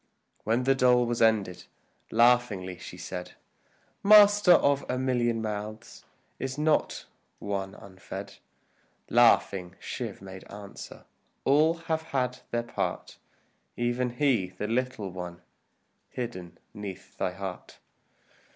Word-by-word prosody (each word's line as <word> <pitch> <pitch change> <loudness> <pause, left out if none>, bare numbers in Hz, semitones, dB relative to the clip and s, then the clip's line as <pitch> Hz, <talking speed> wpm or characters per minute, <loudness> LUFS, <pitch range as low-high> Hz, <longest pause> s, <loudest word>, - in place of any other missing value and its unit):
When 115 +3 +1
the 135 +1 +4
dole 125 -2 +4
was 120 0 -2
ended, 105 -5 +2 0.4
laughingly 115 -6 +2
she - - -9
said, 90 -1 -7 0.7
"Master, 205 -2 +7
of 140 -4 +3
a 125 - 0
million 120 -3 0
mouths, 110 +1 -6 0.3
is 135 +1 -4
not 155 +1 +1 0.3
one 95 -1 -4
unfed?" 95 -2 -9 0.7
Laughing, 90 -1 +3
Shiv - - -5
made 95 -1 -10
answer, 100 -1 -10 0.4
"All 155 +4 +4
have 160 -1 0
had 130 -5 -2
their 120 0 -1
part, 115 - -4 0.6
Even 120 +1 0
he, 130 -10 +2
the 95 +3 -5
little 115 -4 -2
one, 90 -1 -8 0.7
hidden 105 -9 -6 0.2
'neath 100 -2 -8
thy 90 - -1
heart." 95 -1 -7
115 Hz, 115 wpm, -28 LUFS, 95-130 Hz, 0.7 s, Master